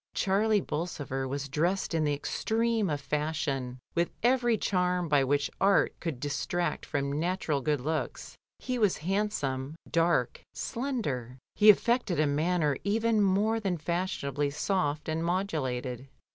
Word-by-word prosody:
Charlie 205 Hz, +2 st, +2 dB
Bolsover 145 Hz, -5 st, -3 dB
was 140 Hz, +1 st, -3 dB
dressed 170 Hz, +7 st, 0 dB
in 160 Hz, -2 st, +1 dB
the 145 Hz, -, +1 dB
extreme 225 Hz, +6 st, 0 dB
of 145 Hz, -1 st, -1 dB
fashion, 140 Hz, -4 st, -2 dB, 0.2 s
with 170 Hz, 0 st, +1 dB
every 240 Hz, -2 st, +3 dB
charm 180 Hz, -3 st, 0 dB
by 145 Hz, -3 st, +4 dB
which 140 Hz, +1 st, +1 dB
art 195 Hz, 0 st, +4 dB
could 160 Hz, -7 st, -4 dB
de 145 Hz, -, -3 dB
tract 170 Hz, +3 st, -2 dB
from 140 Hz, 0 st, -1 dB
natural 170 Hz, -4 st, 0 dB
good 150 Hz, +1 st, +1 dB
looks. 155 Hz, +3 st, -3 dB, 0.2 s
He 255 Hz, -1 st, -3 dB
was 210 Hz, -5 st, +3 dB
handsome, 155 Hz, -9 st, -1 dB
dark, 165 Hz, -7 st, +1 dB
slender; 150 Hz, -, -3 dB, 0.2 s
he 210 Hz, 0 st, +6 dB
affected 220 Hz, -, +4 dB
a 155 Hz, -, +4 dB
manner 150 Hz, 0 st, +1 dB
even 220 Hz, +2 st, +2 dB
more 205 Hz, +3 st, +2 dB
than 195 Hz, -5 st, -1 dB
fashionably 150 Hz, -4 st, -1 dB
soft 150 Hz, 0 st, -1 dB
and 160 Hz, +1 st, -1 dB
modulated. 135 Hz, -9 st, -2 dB
165 Hz, 140 wpm, -29 LUFS, 145-200 Hz, 0.2 s, he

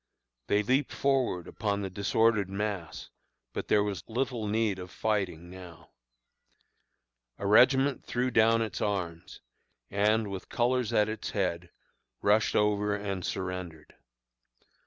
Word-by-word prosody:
They 105 Hz, +1 st, +2 dB
leaped 130 Hz, +5 st, +1 dB
forward 130 Hz, -11 st, 0 dB
upon 100 Hz, -2 st, -2 dB
the 95 Hz, -, -3 dB
disordered 100 Hz, +1 st, +2 dB
mass; 100 Hz, -4 st, -4 dB, 0.4 s
but -, -, -4 dB
there 105 Hz, -, +4 dB
was 100 Hz, -4 st, -3 dB
little 120 Hz, -2 st, -2 dB
need 105 Hz, -2 st, 0 dB
of 90 Hz, 0 st, -8 dB
fighting 95 Hz, -7 st, -2 dB
now. 90 Hz, -3 st, -12 dB, 1.5 s
A 100 Hz, -, -6 dB
regiment 130 Hz, +6 st, +4 dB
threw 125 Hz, +1 st, -1 dB
down 115 Hz, 0 st, +4 dB
its 110 Hz, -, -5 dB
arms, 85 Hz, -5 st, -3 dB, 0.5 s
and, 105 Hz, +1 st, +2 dB
with 95 Hz, -1 st, -7 dB
colors 125 Hz, -1 st, +1 dB
at 105 Hz, 0 st, +3 dB
its 110 Hz, -1 st, -4 dB
head, 90 Hz, -3 st, -2 dB, 0.5 s
rushed 105 Hz, +2 st, +2 dB
over 105 Hz, 0 st, +2 dB
and 100 Hz, -3 st, -4 dB
surrendered. 90 Hz, -5 st, -5 dB
105 Hz, 125 wpm, -29 LUFS, 95-110 Hz, 1.5 s, there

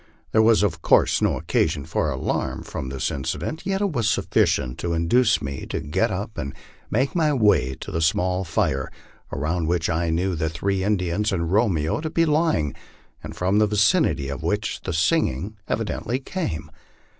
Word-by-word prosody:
There 110 Hz, -, +4 dB
was, 110 Hz, -1 st, +5 dB
of 90 Hz, -6 st, 0 dB
course, -, -, +4 dB
no -, -, +1 dB
occa -, -, +1 dB
sion 70 Hz, -, -5 dB
for 80 Hz, -1 st, -1 dB
alarm 65 Hz, -2 st, -2 dB
from 65 Hz, -, -5 dB
this 65 Hz, -1 st, -2 dB
incident, 155 Hz, -, -4 dB
yet 195 Hz, 0 st, 0 dB
it 200 Hz, -2 st, +1 dB
was 115 Hz, -7 st, +1 dB
sufficient 65 Hz, -9 st, +1 dB
to 85 Hz, -1 st, -2 dB
induce 105 Hz, +7 st, +2 dB
me 70 Hz, -1 st, -5 dB
to -, -, -3 dB
get 75 Hz, +1 st, 0 dB
up -, -, -4 dB
and 70 Hz, -, -5 dB, 0.3 s
make 130 Hz, +5 st, +1 dB
my 160 Hz, -4 st, +2 dB
way 105 Hz, -, +3 dB
to -, -, -6 dB
the 80 Hz, -, -1 dB
small 90 Hz, +3 st, +1 dB
fire, 65 Hz, -5 st, 0 dB, 0.4 s
around 80 Hz, +4 st, -1 dB
which 85 Hz, -1 st, 0 dB
I 85 Hz, +1 st, 0 dB
knew 90 Hz, +4 st, 0 dB
the 80 Hz, -1 st, -1 dB
three 95 Hz, +4 st, -1 dB
Indians 100 Hz, +1 st, 0 dB
and 85 Hz, -3 st, -1 dB
Romeo 95 Hz, -, +1 dB
to.be 165 Hz, +1 st, +1 dB
lying, 150 Hz, -, +1 dB, 0.5 s
and -, -, -7 dB
from 95 Hz, +3 st, +1 dB
the 105 Hz, -, +4 dB
vicinity 100 Hz, -9 st, +2 dB
of 70 Hz, -1 st, -5 dB
which 105 Hz, +7 st, -2 dB
the 95 Hz, -, -4 dB
singing 80 Hz, +4 st, +1 dB
evidently 115 Hz, +3 st, -2 dB
came. 85 Hz, -, -4 dB
90 Hz, 180 wpm, -23 LUFS, 80-110 Hz, 0.5 s, was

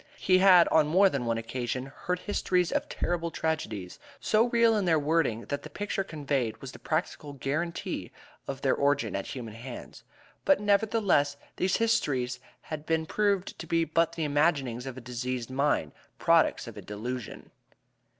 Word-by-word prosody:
He 185 Hz, -1 st, +3 dB
had 185 Hz, -3 st, +7 dB
on 155 Hz, -2 st, +4 dB
more 190 Hz, +5 st, +5 dB
than 135 Hz, -3 st, -2 dB
one 115 Hz, 0 st, +1 dB
occasion 125 Hz, +3 st, -4 dB
heard 180 Hz, -1 st, -2 dB
histories 180 Hz, -4 st, 0 dB
of -, -, -1 dB
terrible 170 Hz, -1 st, -2 dB
tragedies, 115 Hz, -, -3 dB, 0.2 s
so 220 Hz, +2 st, +3 dB
real 235 Hz, -2 st, +3 dB
in 205 Hz, -3 st, +1 dB
their 165 Hz, -2 st, +4 dB
wording 150 Hz, -6 st, +1 dB
that 145 Hz, -, -2 dB
the 155 Hz, -, -9 dB
picture 200 Hz, +4 st, -2 dB
conveyed 140 Hz, -, -2 dB
was 130 Hz, +2 st, -8 dB
the -, -, -12 dB
practical 155 Hz, -2 st, -3 dB
guarantee 155 Hz, +5 st, -3 dB, 0.4 s
of 135 Hz, -1 st, -5 dB
their 135 Hz, -, +3 dB
origin 140 Hz, -7 st, +1 dB
at 100 Hz, -, -3 dB
human 120 Hz, -5 st, -6 dB
hands; 120 Hz, +2 st, -9 dB, 0.4 s
but, 285 Hz, -, +4 dB
nevertheless, 200 Hz, -8 st, +2 dB, 0.2 s
these 185 Hz, 0 st, +1 dB
histories 140 Hz, -, 0 dB, 0.2 s
had 155 Hz, -1 st, -7 dB
been 160 Hz, 0 st, +1 dB
proved 200 Hz, +1 st, 0 dB
to 170 Hz, -, -7 dB
be 165 Hz, 0 st, +2 dB
but 165 Hz, +1 st, +1 dB
the 165 Hz, -, -3 dB
imaginings 140 Hz, -5 st, +1 dB
of 130 Hz, -1 st, -6 dB
a -, -, -7 dB
diseased 125 Hz, 0 st, -4 dB
mind 135 Hz, -, +1 dB, 0.3 s
products -, -, +3 dB
of -, -, -9 dB
a -, -, -6 dB
delusion. 115 Hz, +3 st, -6 dB
150 Hz, 170 wpm, -28 LUFS, 125-180 Hz, 0.4 s, had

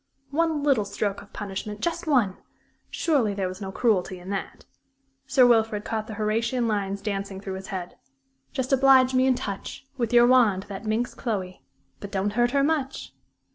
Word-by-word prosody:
One 315 Hz, -1 st, +1 dB
little 275 Hz, -7 st, +3 dB
stroke 200 Hz, 0 st, -3 dB
of -, -, -16 dB
punishment 205 Hz, +1 st, -5 dB
just 340 Hz, +5 st, -2 dB
one! 240 Hz, -11 st, +2 dB, 0.5 s
Surely 255 Hz, -11 st, +1 dB
there 195 Hz, -2 st, -1 dB
was 185 Hz, +2 st, -7 dB
no 190 Hz, -1 st, -5 dB
cruelty 190 Hz, -4 st, +1 dB
in 180 Hz, +2 st, -8 dB
that. 195 Hz, -, -5 dB, 0.6 s
Sir 265 Hz, -1 st, +5 dB
Wilfrid 225 Hz, -3 st, +3 dB
caught 220 Hz, -1 st, -3 dB
the 215 Hz, -, -6 dB
Horatian 230 Hz, +3 st, 0 dB
lines 200 Hz, -2 st, -2 dB
dancing 200 Hz, -2 st, -3 dB
through 195 Hz, -1 st, -6 dB
his 190 Hz, 0 st, -7 dB
head: 185 Hz, -4 st, -6 dB, 0.5 s
"Just 260 Hz, 0 st, -2 dB
oblige 265 Hz, -1 st, +5 dB
me 255 Hz, +1 st, +3 dB
and 255 Hz, -2 st, +3 dB
touch 200 Hz, +5 st, -6 dB
With 235 Hz, -3 st, -1 dB
your 240 Hz, 0 st, +7 dB
wand 235 Hz, -7 st, +4 dB
that 200 Hz, +2 st, -7 dB
minx 225 Hz, +3 st, -1 dB
Chloe 190 Hz, -7 st, -4 dB, 0.4 s
But 200 Hz, -, -8 dB
don't 200 Hz, +1 st, -1 dB
hurt 240 Hz, +2 st, +3 dB
her 275 Hz, +2 st, +2 dB
much!" 285 Hz, -3 st, -1 dB
220 Hz, 175 wpm, -25 LUFS, 200-255 Hz, 0.6 s, your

